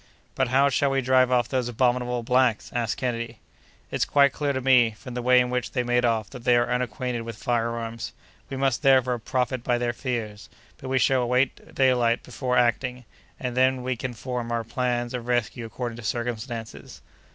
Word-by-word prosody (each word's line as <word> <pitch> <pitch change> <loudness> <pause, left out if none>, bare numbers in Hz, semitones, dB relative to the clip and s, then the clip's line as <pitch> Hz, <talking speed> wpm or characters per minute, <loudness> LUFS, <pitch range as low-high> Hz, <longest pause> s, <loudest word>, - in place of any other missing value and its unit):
"But 130 -1 +1
how 135 +3 +4
shall 140 +1 +1
we 135 0 +1
drive 130 0 +4
off 125 -2 +2
those 130 -3 -1
abominable 125 0 0
blacks?" 125 -2 +2
asked 120 -2 -1
Kennedy. 115 -2 -3 0.5
"It's - - +1
quite 140 -1 +4
clear 145 -1 -1
to 130 - -1
me, 125 -4 +4
from 125 - -9
the 125 - -3
way 125 +1 +5
in 125 0 +1
which 125 -1 -2
they 125 - 0
made 120 0 +2
off, 110 -3 +1
that 125 -4 -9
they 125 -1 +4
are 120 +1 +1
unacquainted 125 0 -2
with 115 -1 -7
fire 120 -1 0
arms. 115 0 -5 0.4
We 135 - -5
must, 135 -2 +1
therefore, 130 -3 +4
profit 125 +1 -1
by 120 -1 +1
their 120 0 -1
fears; 115 -5 -4 0.3
but 130 - -7
we 135 - +1
shall 130 +1 +3
await 125 +2 -1
daylight 125 -3 +3
before 125 0 -2
acting, 125 +1 +1 0.3
and 125 -2 -4
then 130 0 +2
we 130 0 -1
can 125 +1 -5
form 120 0 -4
our 115 -1 -1
plans 120 +1 -2
of 120 -1 -5
rescue 120 -1 -1
according 115 0 -5
to 120 - -9
circumstances." 115 0 -5
125 Hz, 195 wpm, -25 LUFS, 120-130 Hz, 0.5 s, way